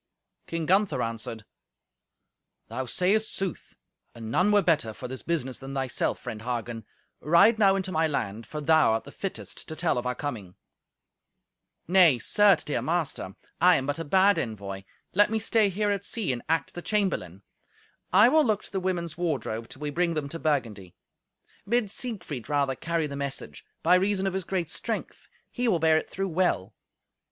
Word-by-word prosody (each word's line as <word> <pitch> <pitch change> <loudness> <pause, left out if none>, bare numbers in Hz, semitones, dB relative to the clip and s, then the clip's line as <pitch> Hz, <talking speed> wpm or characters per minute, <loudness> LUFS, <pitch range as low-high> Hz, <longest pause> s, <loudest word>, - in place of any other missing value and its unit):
King 165 -1 -3
Gunther 195 +4 +2
answered, 115 -1 -5 1.2
"Thou 130 -1 -4
sayest 200 - +1
sooth. 190 -3 -4 0.4
And 115 -1 -7
none 185 - +3
were 205 -1 +4
better 155 -10 +1
for 125 - -7
this 130 0 -6
business 135 -7 -2
than 135 +1 -7
thyself, 130 -2 -1
friend 110 - -7
Hagen. 120 -2 -4 0.3
Ride 185 +8 +5
now 195 -2 +5
into 190 -1 -2
my 160 -1 +2
land, 110 -6 -3
for 150 - -5
thou 155 -5 +4
art 115 - -1
the 140 - -11
fittest 195 +4 -6
to 160 - -6
tell 160 -6 +1
of 120 - -4
our 125 - -1
coming." 110 -11 -5 1.3
"Nay, 175 -6 +6
certes, 205 - +4
dear 150 - -2
master, 155 - -2 0.3
I 180 +1 +7
am 135 - -1
but 145 +3 -2
a - - -2
bad 190 +5 +4
envoy. 100 -3 -5 0.3
Let 205 +2 +4
me 225 - 0
stay 220 -1 +2
here 205 +2 0
at 200 -1 -2
sea 200 - -1
and 120 - -5
act 165 0 0
the 175 - -6
chamberlain. 170 - -1 0.7
I 205 +5 +7
will 310 +4 +5
look 215 -5 0
to - - -12
the 195 - -1
women's 175 -3 -3
wardrobe, 115 -9 -2
till 140 - -10
we 145 - -2
bring 170 +1 0
them 150 -2 -2
to 165 - -6
Burgundy. 110 - -2 0.7
Bid 235 -3 +1
Siegfried 190 - -6
rather 140 -2 +1
carry 165 +4 -2
the 140 -1 -5
message; 135 - -5 0.2
by 170 - +5
reason 195 +1 +2
of 190 - -1
his 190 -2 -3
great 180 -4 -2
strength - - -5 0.2
he 245 -1 -1
will 200 -6 +3
bear 160 0 +4
it - - -3
through 195 0 -3
well. 175 - 0
160 Hz, 180 wpm, -27 LUFS, 125-190 Hz, 1.3 s, I